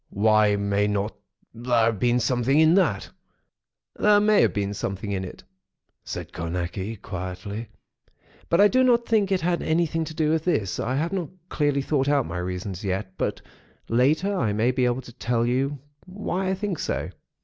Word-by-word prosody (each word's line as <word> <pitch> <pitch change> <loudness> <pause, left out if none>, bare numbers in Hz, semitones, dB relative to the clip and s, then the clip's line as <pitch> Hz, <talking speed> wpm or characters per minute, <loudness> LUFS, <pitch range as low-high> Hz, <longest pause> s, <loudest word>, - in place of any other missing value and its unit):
"Why 105 0 +3
may 100 0 +1
not 105 +1 -1 0.4
there 120 0 +1
have 110 -3 0
been 120 +2 +2
something 125 +4 +2
in 160 +1 +6
that?" 195 +1 +1 0.8
"There 210 0 +4
may 210 0 +4
have - - +3
been 100 -1 -2
something 100 0 -4
in 95 -1 -2
it," 90 - -9 0.6
said - - -7
Carnacki, 90 +5 -4
quietly. 95 +4 -6 0.8
"But 170 - +3
I 205 - +8
do 255 +4 +3
not 240 -2 +3
think 210 -3 +2
it 190 - +2
had 175 +1 0
anything 165 0 0
to 160 - -8
do 155 -1 +1
with 160 -1 +1
this. 110 - 0
I 125 +3 -1
have 165 +6 -1
not 180 -5 -2 0.2
clearly 145 -2 0
thought 140 -1 0
out 145 -3 +2
my 90 +1 -4
reasons, 90 +1 -5
yet; 95 0 -3
but - - -2 0.5
later 150 - +2
I 110 - 0
may 110 +4 +2
be 130 0 +1
able 125 +1 0
to 120 - -13
tell 120 -1 0
you 135 +4 0 0.3
why 190 -1 -3
I 190 - +1
think 190 -3 -3
so." - - -3
125 Hz, 180 wpm, -25 LUFS, 105-165 Hz, 0.8 s, I